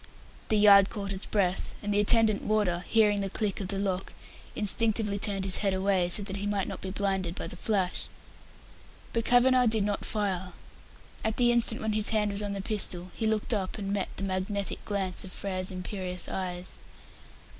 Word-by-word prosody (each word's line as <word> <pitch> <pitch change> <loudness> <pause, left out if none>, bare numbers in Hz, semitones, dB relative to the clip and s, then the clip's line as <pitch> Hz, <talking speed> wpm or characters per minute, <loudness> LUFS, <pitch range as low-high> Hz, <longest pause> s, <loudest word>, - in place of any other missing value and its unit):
The 215 - +3
yard 200 -1 +7
caught 200 -2 -4
its 190 - -3
breath, 190 -3 0
and 205 0 -1
the 205 - +2
attendant 215 0 +3
warder, 200 -5 0
hearing 210 -2 +3
the 195 - -2
click 205 0 -1
of 190 - -4
the 195 +1 -1
lock, 195 -1 -2 0.4
instinctively 210 0 +2
turned 195 -1 0
his 190 - +5
head 195 -2 +1
away, 190 -2 +1
so 200 +3 +6
that 195 0 -5
he 200 +1 -3
might 205 -2 -1
not - - -6
be 190 - -5
blinded 190 -3 -2
by - - -5
the - - -7
flash. 190 -1 -1 1.1
But 230 -1 -1
Kavanagh 250 0 +4
did 220 -2 +2
not 205 0 -2
fire. 190 -4 -2 0.7
At 220 0 -1
the 240 -1 +4
instant 235 -1 +3
when 220 -1 -1
his 215 0 +2
hand 210 -2 +1
was 200 +1 -2
on 205 -1 -3
the 195 -1 -5
pistol, 185 -4 -2
he 220 - -2
looked 220 +2 -1
up 195 -2 -2
and 200 -1 -3
met 200 -2 -2
the - - -4
magnetic 195 +1 -2
glance 195 -3 -2
of 185 - -10
Frere's 185 -1 -3
imperious 185 -1 -2
eyes. 180 -1 -4
200 Hz, 195 wpm, -28 LUFS, 190-215 Hz, 1.1 s, yard